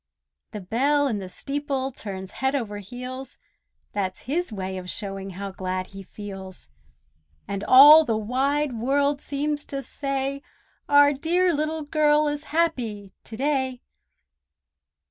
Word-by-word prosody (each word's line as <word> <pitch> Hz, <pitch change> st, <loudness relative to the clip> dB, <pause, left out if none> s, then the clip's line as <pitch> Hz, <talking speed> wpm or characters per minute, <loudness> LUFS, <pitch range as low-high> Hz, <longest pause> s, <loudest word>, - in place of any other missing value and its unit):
The 210 Hz, -, -7 dB
bell 280 Hz, +9 st, +2 dB
in 220 Hz, -6 st, -1 dB
the 190 Hz, -2 st, -7 dB
steeple 275 Hz, +3 st, -3 dB
turns 190 Hz, -5 st, -7 dB
head 265 Hz, +1 st, +1 dB
over 210 Hz, -6 st, -3 dB
heels, 250 Hz, +6 st, -8 dB, 0.6 s
That's 190 Hz, -2 st, -3 dB
his 320 Hz, +4 st, -2 dB
way 190 Hz, -2 st, -4 dB
of 180 Hz, 0 st, -8 dB
showing 195 Hz, -1 st, -4 dB
how 200 Hz, 0 st, -5 dB
glad 185 Hz, -1 st, -3 dB
he 195 Hz, -, -8 dB
feels; 190 Hz, -, -9 dB, 0.8 s
And 200 Hz, 0 st, -4 dB
all 290 Hz, +7 st, +9 dB
the 225 Hz, -7 st, 0 dB
wide 270 Hz, +6 st, 0 dB
world 280 Hz, +4 st, +1 dB
seems 290 Hz, +1 st, -2 dB
to 275 Hz, -1 st, -5 dB
say, 275 Hz, +1 st, -3 dB, 0.5 s
"Our 285 Hz, 0 st, +6 dB
dear 345 Hz, +5 st, +2 dB
Little 310 Hz, +1 st, -1 dB
Girl 300 Hz, 0 st, +3 dB
is 295 Hz, +1 st, -3 dB
happy 235 Hz, -, -1 dB
to 220 Hz, -, -8 dB
day!" 265 Hz, -2 st, -1 dB
265 Hz, 135 wpm, -25 LUFS, 205-290 Hz, 0.8 s, all